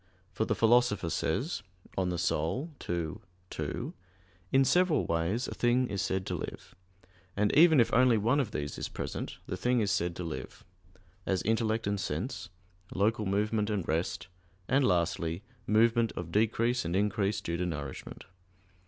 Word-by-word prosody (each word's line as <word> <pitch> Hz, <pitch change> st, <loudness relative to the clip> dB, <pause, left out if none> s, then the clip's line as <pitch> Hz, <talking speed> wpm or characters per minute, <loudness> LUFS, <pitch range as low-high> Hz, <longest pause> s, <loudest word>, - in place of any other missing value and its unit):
For 105 Hz, +4 st, -1 dB
the -, -, 0 dB
Philosopher 115 Hz, -7 st, +3 dB
says 125 Hz, -, -1 dB, 0.3 s
(De -, -, +1 dB
Anima 90 Hz, -, 0 dB, 0.2 s
ii, 85 Hz, -1 st, -1 dB, 0.4 s
2): -, -, -3 dB, 0.6 s
"In 135 Hz, 0 st, +5 dB
several 180 Hz, 0 st, +3 dB
ways 85 Hz, +9 st, 0 dB
a -, -, -5 dB
thing 125 Hz, +1 st, +2 dB
is 100 Hz, -2 st, -2 dB
said 95 Hz, 0 st, -1 dB
to -, -, -3 dB
live, -, -, -7 dB, 0.6 s
and 105 Hz, 0 st, +2 dB
even 160 Hz, -2 st, +7 dB
if 115 Hz, -, +3 dB
only 125 Hz, -1 st, +5 dB
one 115 Hz, +7 st, +2 dB
of 130 Hz, -7 st, 0 dB
these 75 Hz, -7 st, -4 dB
is -, -, -3 dB
present, -, -, -5 dB
the -, -, -4 dB
thing 125 Hz, 0 st, +1 dB
is 105 Hz, -3 st, +1 dB
said 90 Hz, -3 st, 0 dB
to 90 Hz, -, -5 dB
live; 80 Hz, -2 st, -7 dB, 0.6 s
as 95 Hz, -2 st, +1 dB
intellect 110 Hz, +1 st, +1 dB
and 100 Hz, 0 st, 0 dB
sense, 90 Hz, -, -3 dB, 0.5 s
local 105 Hz, +1 st, +1 dB
movement 105 Hz, +2 st, +1 dB
and 100 Hz, -5 st, -2 dB
rest, 85 Hz, +1 st, -1 dB, 0.4 s
and 135 Hz, +2 st, +3 dB
lastly, 85 Hz, 0 st, 0 dB, 0.2 s
movement 115 Hz, +1 st, +3 dB
of 85 Hz, -1 st, -6 dB
decrease 115 Hz, +4 st, +2 dB
and 85 Hz, +1 st, -2 dB
increase 100 Hz, 0 st, +1 dB
due 85 Hz, 0 st, -3 dB
to 90 Hz, -, -1 dB
nourishment." 70 Hz, -5 st, -6 dB
105 Hz, 160 wpm, -30 LUFS, 85-115 Hz, 0.6 s, even